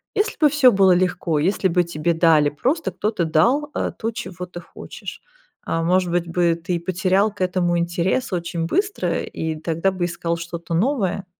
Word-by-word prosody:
Если 425 +1 0
бы 300 - +6
всё 275 -4 +5
было 195 -2 +5
легко, 175 -3 0
если 190 +5 +1
бы 175 +1 +2
тебе 170 0 -1
дали, 160 -3 +4
просто 270 - -1
кто-то 210 -5 -1
дал, 240 - +2
э, - - -1
то, 225 +1 -2
чего 185 -6 -6
ты 175 0 -9
хочешь, - - -10 0.4
а, 165 0 -1
может 180 +1 +2
быть 175 -1 0
бы, 170 0 +1
ты 175 -1 -1
потерял 185 +4 +1
к 205 - -11
этому 180 -1 +1
интерес 175 +7 -1
очень 170 -1 -2
быстро 400 - -1
и 160 -1 -4
тогда 165 +4 -1
бы 185 -2 -2
искал 170 -1 -2
что-то 170 0 -6
новое? 200 - 0
180 Hz, 180 wpm, -21 LUFS, 170-200 Hz, 0.4 s, бы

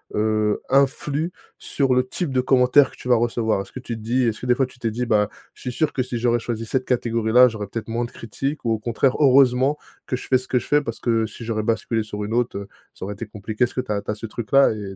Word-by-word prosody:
heu, 105 0 +1
influe 140 +4 +1 0.3
sur 135 -3 0
le 125 0 +2
type 160 +2 -3
de 130 - +3
commentaire 130 +2 +4
que - - -16
tu - - -9
vas 120 - +6
recevoir? 115 -3 0
Est-ce - - -11
que - - -6
tu 120 - -5
te - - -11
dis, 120 +4 +1
est-ce 115 -3 0
que - - -5
des 125 -1 +3
fois 135 - +2
tu 125 0 -15
t'es 115 -2 -1
dit: 120 +3 -2
«Bah 105 -2 +2 0.2
je - - -18
suis 125 - -4
sûr 155 +2 0
que 130 - 0
si 125 -1 -4
j'aurais 120 0 +2
choisi 115 -1 -4
cette 130 +2 -1
catégorie 120 -2 0
là, 125 +1 +8
j'aurais 105 -2 -6
peut-être 115 +2 -6
moins 120 +1 -1
de - - -10
critiques», 135 +6 -5
ou 115 - +1
au 110 - -2
contraire: 120 +4 +1
«Heureusement 135 0 +4 0.3
que 125 - -1
je - - -7
fais 130 - +4
ce 130 - -9
que 125 - +1
je - - -10
fais 145 0 +3
parce 115 -5 -6
que 115 -2 +1
si 110 +2 -9
j'aurais 110 -1 -2
basculé 115 0 0
sur 105 -1 -6
une 105 +2 -4
autre, 120 -3 0
heu, 100 0 -6 0.3
ça - - -10
aurait 105 - -4
été 115 - -6
compliqué.», 105 +2 -3
est-ce - - -9
que 125 - 0
tu 125 - -7
as 100 -1 0
tu - - -12
as - - -3
ce 110 - -7
truc 110 0 -7
là 140 0 +7
et 100 -3 -6
120 Hz, 295 wpm, -22 LUFS, 110-130 Hz, 0.3 s, là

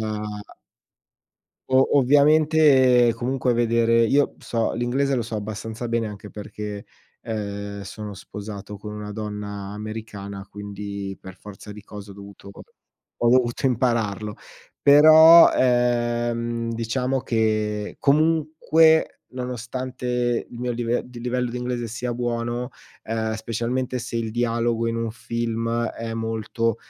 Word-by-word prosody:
uhm 105 -1 -5 1.2
O 130 +2 +4
ovviamente, 140 -3 +5
comunque, 125 +1 0
vedere 115 0 +3
io 140 +5 +3
b - - -25
so 115 -1 -1
l'inglese 130 +4 0
lo 125 - 0
so 115 0 -6
abbastanza 110 +3 -5
bene, 115 -1 0
anche 105 -1 -8
perché, 105 0 -7 0.4
uhm, 100 -2 -5
sono 105 +1 -7
sposato 105 +1 -8
con 105 +1 -8
una 105 0 -6
donna 105 -2 -6
americana, 105 -2 -7
quindi, 100 -1 -6
per 95 -1 -11
forza 105 +1 -11
di 105 0 -11
cose 105 0 -10
ho - - -11
dovuto 100 0 -12 0.7
ho 120 - +1
dovuto 125 -1 +2
impararlo. 115 -5 0 0.5
Però, 155 +3 +9
ehm, 120 -1 +1
diciamo, 125 +3 -1
che, 110 -2 -1
comunque, 160 +1 +3
nonostante 125 -1 -3
il 120 - -11
mio 125 0 -2
live 120 0 -1
di 125 -1 -11
livello 125 +1 -1
di 125 - -5
inglese 125 -1 -3
sia 120 +2 -4
buono, 120 +1 -2 0.4
uhm, 110 0 -2
specialmente 120 +3 -2
se 120 0 -5
il 115 -1 -2
dialogo 115 0 0
in 115 0 -1
un 115 -1 -2
film 115 0 -2
è 115 0 -6
molto, 115 0 -2
115 Hz, 125 wpm, -23 LUFS, 105-125 Hz, 1.2 s, Però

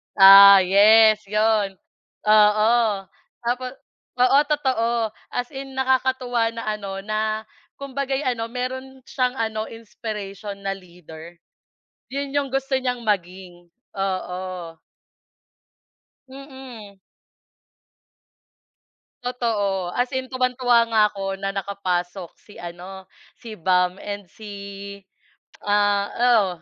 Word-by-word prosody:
Ah, 195 0 +9
yes 215 +3 +6
yun. 210 -1 +1 0.5
Oo 215 +1 +5 0.7
tapos, 250 +1 -2 0.5
oo 255 +2 +5
totoo 240 -6 0 0.2
as 245 0 -3
in 270 0 -7
nakakatuwa 260 -3 0
na 230 - -5
ano 200 -2 -4
na 215 +1 -2 0.4
kumbaga'y 275 0 -3
ano 230 -2 -1
meron 260 +2 -5
siyang 255 -1 -1
ano 220 -2 -3
inspiration 210 -3 -7
na 195 - -1
leader. 170 -2 -13 0.8
Yun 280 0 -4
yung 285 -1 0
gusto 270 0 -2
niyang 250 -2 -3
maging, 180 -3 -4 0.3
oo. 185 -3 -4 1.5
Mm. 260 -7 -12 2.3
Totoo 205 -7 -1
as 245 0 +1
in 260 0 -3
tuwang-tuwa 250 -1 +2
nga 220 - +5
ako 195 -1 -5
na 195 - -1
nakapasok 190 -2 -3
si 205 - -18
ano 180 +2 -9 0.3
si 225 -3 -9
Bam 180 +1 +1
and 205 -3 -7
si, 210 +3 -11 1.1
ah, 205 -1 +2 0.2
oo, 235 -5 +4
215 Hz, 100 wpm, -22 LUFS, 195-250 Hz, 2.3 s, Ah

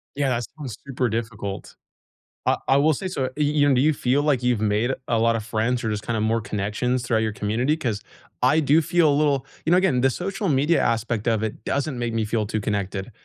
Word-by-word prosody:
Yeah, 140 -1 0
that 120 -2 -1
sounds 135 -8 -7
super 130 -2 -1
difficult. 110 -3 -5 0.7
I - - +3
I 135 - +5
will 150 +3 +4
say 185 +6 -3
so, 160 -8 -2
y 150 - 0
you 145 -1 +3
do 125 - +3
you 155 +2 +3
feel 135 +2 +1
like 145 -5 +1
you've 125 -3 +1
made 110 +4 +1 0.2
a 115 - +2
lot 115 0 +3
of 110 - -4
friends 115 +2 -1
or 110 - -1
just 105 -1 -3
kinda 115 -2 -1
more 115 +1 +1
connections 105 +5 -2
throughout 115 -2 +1
your 110 - -1
community? 110 +8 0
'Cause 115 -10 -3 0.4
I 140 +5 +4
do 155 +2 +4
feel 170 -1 +3
a - - +2
little 140 -3 +1 0.2
you 160 - 0
know, 180 - +6
again, 170 -10 +2
the 135 - +4
social 195 - -3
media 150 +3 +3
aspect 115 -1 -1
of 110 -2 +1
it 110 0 -4
doesn't 140 -1 -2
make 120 -1 -2
me 115 -1 0
feel 110 0 -1
too 110 +1 -2
connected, 100 0 -3
125 Hz, 230 wpm, -23 LUFS, 110-145 Hz, 0.7 s, know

